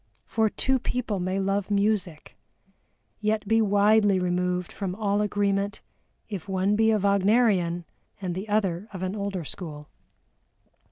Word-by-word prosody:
For 220 Hz, -1 st, +1 dB
two 265 Hz, +4 st, 0 dB
people 230 Hz, -5 st, -2 dB
may 185 Hz, +2 st, -1 dB
love 195 Hz, +1 st, -1 dB
music, 200 Hz, -5 st, 0 dB, 0.8 s
yet 215 Hz, -1 st, -1 dB
be 225 Hz, +1 st, +4 dB
widely 205 Hz, -1 st, +4 dB
removed 180 Hz, 0 st, -1 dB
from 190 Hz, -3 st, -4 dB
all 205 Hz, -1 st, 0 dB
agreement 200 Hz, -1 st, 0 dB, 0.5 s
if 200 Hz, -3 st, -6 dB
one 190 Hz, +2 st, +1 dB
be 220 Hz, +1 st, +3 dB
a 220 Hz, -, +4 dB
Wagnerian, 200 Hz, -3 st, +2 dB, 0.3 s
and 185 Hz, -3 st, -3 dB
the 190 Hz, +4 st, -5 dB
other 200 Hz, -2 st, 0 dB
of 185 Hz, -1 st, -5 dB
an 185 Hz, +2 st, -2 dB
older 200 Hz, -4 st, -3 dB
school. 150 Hz, -2 st, -7 dB
200 Hz, 135 wpm, -26 LUFS, 185-210 Hz, 0.8 s, be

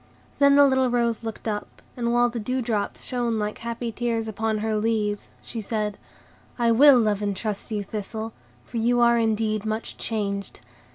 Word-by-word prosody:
Then 280 Hz, 0 st, +6 dB
the 285 Hz, 0 st, +8 dB
little 260 Hz, -2 st, +3 dB
rose 235 Hz, -2 st, +1 dB
looked 225 Hz, 0 st, -6 dB
up, 210 Hz, -1 st, -4 dB, 0.2 s
and 235 Hz, -1 st, -1 dB
while 240 Hz, 0 st, +4 dB
the 235 Hz, 0 st, -4 dB
dew 255 Hz, +4 st, -2 dB
drops 220 Hz, -3 st, -2 dB
shone 240 Hz, -3 st, -1 dB
like 210 Hz, 0 st, -3 dB
happy 235 Hz, 0 st, -4 dB
tears 230 Hz, -1 st, -1 dB
upon 220 Hz, 0 st, -1 dB
her 220 Hz, 0 st, -1 dB
leaves, 210 Hz, -1 st, 0 dB, 0.2 s
she 230 Hz, -, -5 dB
said,— 210 Hz, -1 st, -2 dB, 0.6 s
"I 235 Hz, -2 st, +3 dB
WILL 275 Hz, +3 st, +8 dB
love 210 Hz, -3 st, +1 dB
and 200 Hz, -2 st, -1 dB
trust 210 Hz, -1 st, -3 dB
you, 210 Hz, -2 st, -2 dB
Thistle, 220 Hz, +2 st, -5 dB, 0.3 s
for -, -, -6 dB
you 240 Hz, +2 st, +2 dB
are 235 Hz, 0 st, +5 dB
indeed 215 Hz, -1 st, 0 dB
much 220 Hz, +1 st, -3 dB
changed. 200 Hz, -3 st, -3 dB
225 Hz, 180 wpm, -25 LUFS, 215-235 Hz, 0.6 s, the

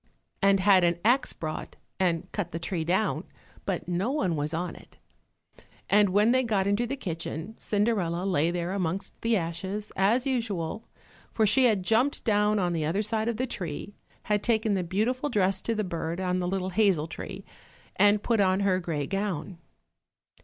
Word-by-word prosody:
and 195 Hz, -1 st, +4 dB
had 190 Hz, -1 st, +5 dB
an 170 Hz, 0 st, +2 dB
axe 250 Hz, +4 st, +3 dB
brought 155 Hz, -1 st, -6 dB, 0.2 s
and 180 Hz, -1 st, 0 dB
cut 185 Hz, -5 st, -3 dB
the 165 Hz, -, -3 dB
tree 170 Hz, 0 st, -3 dB
down, 185 Hz, +6 st, 0 dB, 0.4 s
but -, -, -2 dB
no 180 Hz, +6 st, 0 dB
one 265 Hz, -, 0 dB
was 150 Hz, 0 st, -2 dB
on 170 Hz, +1 st, -3 dB
it. -, -, -17 dB, 0.9 s
And 205 Hz, -1 st, +5 dB
when 205 Hz, +5 st, +4 dB
they 255 Hz, +1 st, +4 dB
got 210 Hz, -6 st, 0 dB
into 205 Hz, +4 st, +1 dB
the 275 Hz, -, -2 dB
kitchen, 170 Hz, -, -5 dB
Cinderella 200 Hz, -5 st, 0 dB
lay 170 Hz, -4 st, +2 dB
there 175 Hz, 0 st, -2 dB
amongst 190 Hz, 0 st, -3 dB
the 230 Hz, -1 st, +2 dB
ashes, 190 Hz, +5 st, -4 dB
as 220 Hz, +7 st, +2 dB
usual, 225 Hz, -6 st, -2 dB, 0.4 s
for 220 Hz, -, +2 dB
she 255 Hz, +5 st, +4 dB
had 210 Hz, -6 st, +3 dB
jumped 235 Hz, +9 st, +1 dB
down 210 Hz, -1 st, +2 dB
on 180 Hz, -3 st, +1 dB
the 160 Hz, -2 st, -1 dB
other 175 Hz, +8 st, 0 dB
side 220 Hz, +1 st, -1 dB
of 235 Hz, -2 st, -1 dB
the 255 Hz, -, 0 dB
tree, 185 Hz, -, -5 dB, 0.3 s
had 210 Hz, -1 st, +1 dB
taken 220 Hz, -2 st, +1 dB
the 190 Hz, -2 st, 0 dB
beautiful 230 Hz, -, -1 dB
dress 195 Hz, -5 st, +1 dB
to 230 Hz, -, -1 dB
the 215 Hz, -, 0 dB
bird 170 Hz, -2 st, -3 dB
on 185 Hz, -1 st, 0 dB
the 180 Hz, -, -1 dB
little 190 Hz, 0 st, -2 dB
hazel 190 Hz, -6 st, +3 dB
tree, 165 Hz, -, -8 dB, 0.5 s
and 205 Hz, 0 st, +4 dB
put 230 Hz, -2 st, +1 dB
on 190 Hz, 0 st, +3 dB
her 190 Hz, -2 st, +2 dB
grey 160 Hz, -5 st, -2 dB
gown. 190 Hz, -2 st, -3 dB
195 Hz, 180 wpm, -27 LUFS, 175-215 Hz, 0.9 s, had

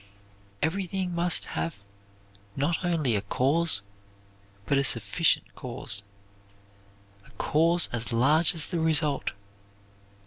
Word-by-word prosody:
Everything 185 Hz, +2 st, -2 dB
must 170 Hz, 0 st, +1 dB
have 85 Hz, +6 st, -4 dB, 0.7 s
not 165 Hz, +6 st, -1 dB
only 160 Hz, -9 st, 0 dB
a 100 Hz, -, 0 dB
cause, 130 Hz, +3 st, +2 dB, 0.8 s
but 140 Hz, -, +2 dB
a -, -, +1 dB
sufficient 135 Hz, -, +2 dB
cause 120 Hz, -5 st, 0 dB, 1.2 s
a -, -, -20 dB
cause 165 Hz, +3 st, +2 dB
as 120 Hz, 0 st, -4 dB
large 150 Hz, +9 st, +3 dB
as 160 Hz, -, -2 dB
the 175 Hz, -, -3 dB
result. 155 Hz, -3 st, +1 dB
155 Hz, 105 wpm, -27 LUFS, 120-170 Hz, 1.2 s, large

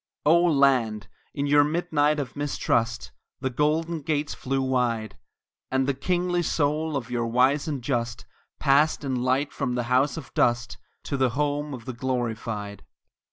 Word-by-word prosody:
Oh, 170 Hz, +3 st, +5 dB
Land! 130 Hz, -, +2 dB, 0.2 s
in 140 Hz, -, -2 dB
your 145 Hz, 0 st, +5 dB
midnight 150 Hz, -1 st, +1 dB
of 140 Hz, -, -5 dB
mistrust 120 Hz, -5 st, -1 dB, 0.3 s
The 130 Hz, 0 st, -2 dB
golden 155 Hz, +4 st, 0 dB
gates 145 Hz, 0 st, -1 dB
flew 135 Hz, +1 st, -2 dB
wide, 120 Hz, -5 st, 0 dB, 0.5 s
And 130 Hz, 0 st, +1 dB
the 140 Hz, -, +1 dB
kingly 175 Hz, +4 st, 0 dB
soul 155 Hz, -1 st, 0 dB
of 120 Hz, -2 st, -6 dB
your 120 Hz, -1 st, -1 dB
wise 130 Hz, +6 st, +2 dB
and 140 Hz, -5 st, -3 dB
just 120 Hz, -2 st, -2 dB, 0.3 s
Passed 150 Hz, +2 st, +3 dB
in 130 Hz, -3 st, -1 dB
light 130 Hz, +3 st, 0 dB
from 125 Hz, -, -2 dB
the 125 Hz, -, 0 dB
house 140 Hz, +5 st, +2 dB
of 155 Hz, -, -9 dB
dust 120 Hz, -1 st, +1 dB, 0.2 s
To 140 Hz, -, -3 dB
the 130 Hz, -1 st, +3 dB
Home 145 Hz, 0 st, -1 dB
of 115 Hz, -2 st, -11 dB
the 130 Hz, -, -5 dB
Glorified! 115 Hz, -5 st, -3 dB
135 Hz, 160 wpm, -25 LUFS, 120-150 Hz, 0.5 s, Oh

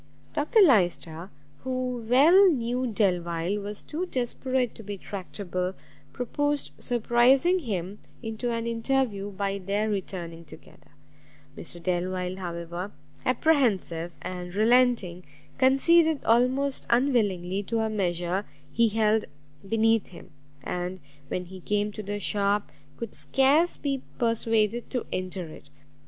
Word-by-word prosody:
Dr 420 Hz, +10 st, +3 dB
Lyster, 175 Hz, -, +2 dB, 0.3 s
who 255 Hz, -2 st, -2 dB
well 335 Hz, +10 st, +7 dB
knew 250 Hz, -3 st, 0 dB
Delvile 180 Hz, -3 st, 0 dB
was 205 Hz, +1 st, -4 dB
too 345 Hz, +4 st, -4 dB
desperate 255 Hz, -2 st, -1 dB
to -, -, -11 dB
be 205 Hz, -1 st, -6 dB
tractable, 185 Hz, -1 st, -4 dB, 0.4 s
proposed 290 Hz, +4 st, -2 dB
surprising 250 Hz, +8 st, +3 dB
him 200 Hz, -, -4 dB, 0.2 s
into 225 Hz, +2 st, -3 dB
an 230 Hz, 0 st, -2 dB
interview 230 Hz, -3 st, -1 dB
by 200 Hz, 0 st, -2 dB
their 205 Hz, +3 st, -1 dB
returning 175 Hz, -4 st, -5 dB
together: 150 Hz, -, -16 dB, 0.7 s
Mr 175 Hz, -, -8 dB
Delvile, 180 Hz, +1 st, -1 dB
however 175 Hz, +1 st, -5 dB, 0.4 s
apprehensive 225 Hz, -, +1 dB
and 180 Hz, 0 st, -6 dB
relenting, 220 Hz, -5 st, +3 dB, 0.4 s
conceded 315 Hz, +4 st, +4 dB
most 255 Hz, +4 st, +2 dB
unwillingly 205 Hz, -8 st, +1 dB
to 225 Hz, +3 st, -1 dB
a 220 Hz, -, +1 dB
measure 180 Hz, -1 st, 0 dB, 0.3 s
he 230 Hz, +4 st, +3 dB
held 215 Hz, 0 st, +2 dB, 0.4 s
beneath 225 Hz, -1 st, +3 dB
him, 175 Hz, -, -13 dB, 0.3 s
and, 180 Hz, +4 st, -4 dB, 0.3 s
when 180 Hz, +4 st, -3 dB
he 185 Hz, +1 st, -10 dB
came 205 Hz, +3 st, -1 dB
to 215 Hz, -, -6 dB
the 205 Hz, 0 st, -4 dB
shop, 205 Hz, 0 st, +1 dB, 0.3 s
could 230 Hz, -2 st, -6 dB
scarce 290 Hz, +6 st, +2 dB
be 275 Hz, -2 st, -2 dB, 0.2 s
persuaded 230 Hz, -1 st, +1 dB
to 250 Hz, -, -3 dB
enter 185 Hz, -1 st, -3 dB
it. 155 Hz, -2 st, -13 dB
215 Hz, 120 wpm, -27 LUFS, 185-250 Hz, 0.7 s, well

